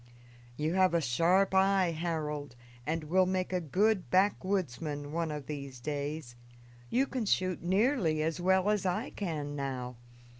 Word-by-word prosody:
"You 155 Hz, +2 st, 0 dB
have 185 Hz, -2 st, +3 dB
a -, -, +4 dB
sharp 170 Hz, +8 st, +2 dB
eye, 190 Hz, -2 st, +4 dB
Harold, 155 Hz, -4 st, -3 dB, 0.3 s
and 160 Hz, +1 st, -1 dB
will 185 Hz, +4 st, +3 dB
make 185 Hz, 0 st, -1 dB
a 180 Hz, -, +1 dB
good 190 Hz, +5 st, +1 dB
backwoodsman 175 Hz, -7 st, 0 dB
one 165 Hz, 0 st, -1 dB
of 150 Hz, -2 st, -5 dB
these 140 Hz, -3 st, -6 dB
days. 145 Hz, -1 st, -4 dB, 0.5 s
You 260 Hz, +3 st, +2 dB
can 255 Hz, -5 st, -3 dB
shoot 185 Hz, -2 st, +1 dB
nearly 185 Hz, -, +2 dB
as 160 Hz, +2 st, -1 dB
well 190 Hz, +2 st, +3 dB
as 210 Hz, -2 st, 0 dB
I 180 Hz, -2 st, -1 dB
can 150 Hz, -7 st, -4 dB
now. 130 Hz, -3 st, -4 dB
170 Hz, 150 wpm, -31 LUFS, 150-190 Hz, 0.5 s, a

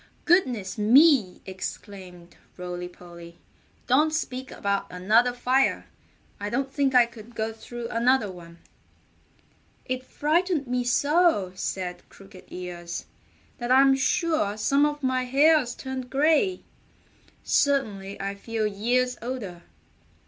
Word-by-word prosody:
"Goodness 245 Hz, -, +1 dB
me!" 240 Hz, -, +4 dB
exclaimed 185 Hz, -2 st, -8 dB, 0.2 s
Rolly 180 Hz, 0 st, -5 dB
Polly. 170 Hz, -1 st, -13 dB, 0.5 s
"Don't 300 Hz, +5 st, +3 dB
speak 260 Hz, -4 st, -4 dB
about 200 Hz, 0 st, -2 dB
another 215 Hz, +7 st, +3 dB
fire! 255 Hz, +2 st, +1 dB, 0.5 s
I 205 Hz, 0 st, -4 dB
don't 270 Hz, +4 st, -2 dB
think 275 Hz, -2 st, +1 dB
I 245 Hz, -1 st, +7 dB
could 235 Hz, 0 st, -14 dB
go 220 Hz, 0 st, -2 dB
through 235 Hz, +1 st, -8 dB
another 235 Hz, -2 st, +2 dB
one." 170 Hz, -2 st, -13 dB, 1.3 s
"It 255 Hz, -1 st, -3 dB
frightened 315 Hz, +3 st, 0 dB
me 250 Hz, 0 st, -1 dB
so," 285 Hz, -, +2 dB
said 180 Hz, -1 st, -4 dB
Crooked 195 Hz, -1 st, -15 dB
Ears, 175 Hz, -1 st, -7 dB, 0.5 s
"that 240 Hz, 0 st, -3 dB
I'm 270 Hz, +1 st, +6 dB
sure 310 Hz, -, 0 dB
some 280 Hz, +6 st, +3 dB
of 295 Hz, -1 st, -5 dB
my 255 Hz, -1 st, 0 dB
hairs 275 Hz, -1 st, +3 dB
turned 260 Hz, -2 st, -6 dB
gray. 320 Hz, +7 st, +2 dB, 0.8 s
Certainly 210 Hz, -9 st, 0 dB
I 195 Hz, 0 st, -3 dB
feel 220 Hz, +2 st, -3 dB
years 245 Hz, +5 st, 0 dB
older." 225 Hz, -8 st, -6 dB
240 Hz, 120 wpm, -25 LUFS, 195-270 Hz, 1.3 s, I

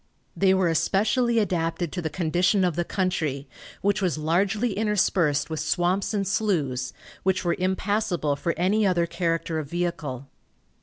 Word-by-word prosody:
They 190 Hz, -1 st, +4 dB
were 190 Hz, -2 st, +2 dB
especially 220 Hz, -, +2 dB
adapted 170 Hz, -5 st, 0 dB
to 180 Hz, -, -3 dB
the 160 Hz, -, -2 dB
condition 180 Hz, +4 st, +1 dB
of 175 Hz, -4 st, +1 dB
the 175 Hz, -, 0 dB
country, 160 Hz, -7 st, -2 dB, 0.4 s
which 205 Hz, +1 st, +1 dB
was 180 Hz, -5 st, 0 dB
largely 195 Hz, +8 st, +1 dB
interspersed 190 Hz, -8 st, +1 dB
with 160 Hz, -, -2 dB
swamps 175 Hz, +4 st, 0 dB
and 200 Hz, -3 st, -1 dB
sloughs, 150 Hz, -, 0 dB, 0.3 s
which 190 Hz, -1 st, 0 dB
were 170 Hz, -, +2 dB
impassable 185 Hz, -4 st, 0 dB
for 170 Hz, +4 st, -2 dB
any 195 Hz, +5 st, +2 dB
other 180 Hz, -4 st, +2 dB
character 165 Hz, -2 st, -1 dB
of 145 Hz, -3 st, -6 dB
vehicle. 160 Hz, -7 st, -3 dB
175 Hz, 150 wpm, -25 LUFS, 160-195 Hz, 0.4 s, They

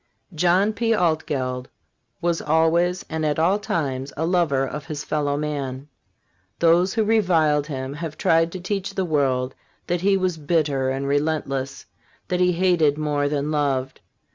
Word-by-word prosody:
John 180 Hz, +6 st, +2 dB
P. 230 Hz, +1 st, +1 dB
Altgeld 140 Hz, -8 st, -1 dB, 0.5 s
was 170 Hz, -1 st, 0 dB
always 170 Hz, +3 st, +2 dB
and 160 Hz, 0 st, -3 dB
at 150 Hz, -1 st, 0 dB
all 180 Hz, +6 st, +2 dB
times 140 Hz, -8 st, -2 dB
a 160 Hz, -, 0 dB
lover 165 Hz, -6 st, +2 dB
of 145 Hz, +1 st, -6 dB
his 150 Hz, -1 st, -5 dB
fellow 145 Hz, -2 st, -1 dB
man. 140 Hz, -2 st, -4 dB, 0.7 s
Those 175 Hz, +4 st, +3 dB
who 220 Hz, -, +2 dB
reviled 165 Hz, -9 st, +2 dB
him 135 Hz, -2 st, -4 dB
have 155 Hz, 0 st, -6 dB
tried 165 Hz, 0 st, +2 dB
to 185 Hz, -, -5 dB
teach 195 Hz, +1 st, -3 dB
the 190 Hz, -, 0 dB
world 135 Hz, -5 st, 0 dB, 0.3 s
that 175 Hz, 0 st, -1 dB
he 195 Hz, +1 st, +3 dB
was 185 Hz, -3 st, -1 dB
bitter 145 Hz, -4 st, 0 dB
and 135 Hz, +1 st, -2 dB
relentless, 140 Hz, -2 st, -1 dB, 0.4 s
that 180 Hz, -, 0 dB
he 180 Hz, 0 st, +3 dB
hated 170 Hz, -5 st, +2 dB
more 145 Hz, -2 st, 0 dB
than 145 Hz, 0 st, -1 dB
loved. 135 Hz, -3 st, -1 dB
155 Hz, 155 wpm, -23 LUFS, 140-175 Hz, 0.7 s, Those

